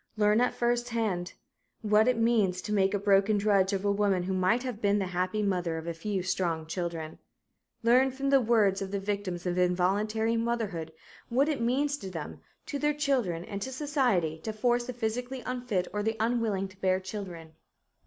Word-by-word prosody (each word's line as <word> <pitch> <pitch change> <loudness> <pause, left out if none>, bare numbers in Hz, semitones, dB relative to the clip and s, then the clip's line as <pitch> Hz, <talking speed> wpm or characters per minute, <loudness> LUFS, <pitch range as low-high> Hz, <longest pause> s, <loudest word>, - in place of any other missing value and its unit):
Learn 210 +2 +4
at 250 - +1
first 240 0 0
hand 210 -7 -2 0.5
what 215 +1 +4
it 250 -2 +3
means 220 -6 +2
to 210 - -3
make 195 0 +2
a - - +2
broken 200 +1 +3
drudge 200 -2 +3
of 195 0 -2
a 200 - +3
woman 200 -3 +1
who 190 +1 -2
might 185 +7 +2
have 245 -4 -5
been 205 0 +3
the 195 - 0
happy 185 +4 0
mother 180 -4 0
of 160 - -6
a 170 - -3
few 190 +3 -3
strong 170 -4 -1
children. 165 -2 -4 0.6
Learn 250 +3 +5
from 275 +1 -2
the 275 -1 +6
words 215 -5 +3
of 195 - -3
the 200 0 -2
victims 195 -3 -3
of 180 0 0
involuntary 205 +6 +1
motherhood 220 -9 -2 0.4
what 265 +5 +2
it 295 -6 -1
means 280 +5 +1
to 190 - -6
them, 165 -5 -7 0.2
to 300 -3 -4
their 295 0 +1
children 250 - 0
and 200 -1 -6
to 265 - -4
society 250 - 0
to 220 - -4
force 240 +2 0
the 250 - -4
physically 245 +2 -3
unfit 245 -7 -2
or 210 - -1
the 220 +1 -1
unwilling 220 -4 0
to 190 +1 -20
bear 185 0 +2
children. 185 -5 -7
210 Hz, 195 wpm, -29 LUFS, 185-240 Hz, 0.6 s, the